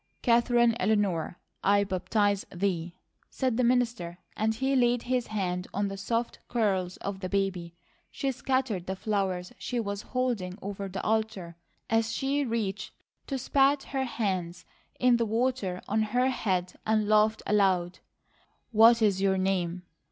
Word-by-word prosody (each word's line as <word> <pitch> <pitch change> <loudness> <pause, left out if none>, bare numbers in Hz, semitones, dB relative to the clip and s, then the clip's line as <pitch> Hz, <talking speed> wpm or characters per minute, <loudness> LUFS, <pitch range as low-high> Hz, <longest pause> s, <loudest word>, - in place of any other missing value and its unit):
"Katherine 235 -1 +4
Eleanor, 190 -5 0 0.3
I 200 +1 +4
baptize 200 +1 0
thee," 175 -2 -2 0.3
said 255 -4 -1
the 250 - +1
minister, 235 -8 +1 0.2
and 220 +1 0
he 265 +3 0
laid 245 -1 +3
his 250 -1 -1
hand 180 -4 -2
on 200 0 0
the 195 - -5
soft 230 +4 -2
curls 190 -6 0
of 195 -1 -5
the 185 -1 -4
baby. 185 -4 -1 0.3
She 275 -1 -2
scattered 260 -8 -1
the 190 - -2
flowers 190 -1 -2
she 245 +5 -2
was 200 -2 -3
holding 235 -9 -2
over 200 0 -5
the 190 +1 -5
altar 215 -6 -1 0.3
as 225 0 +1
she 280 +1 0
reached 215 -5 -3 0.3
to 270 - -2
spat 275 +2 +2
her 265 -1 -2
hands 185 -7 -3 0.3
in 250 -1 +4
the 230 - +1
water 225 -5 -1
on 215 +2 +1
her 245 +4 +1
head 185 -8 -1
and 215 -1 +1
laughed 215 +1 +3
aloud. 185 -4 +2 0.7
"What 230 +1 +6
is 195 -3 +2
your 195 -1 +2
name?" 185 -2 -1
210 Hz, 150 wpm, -28 LUFS, 190-240 Hz, 0.7 s, What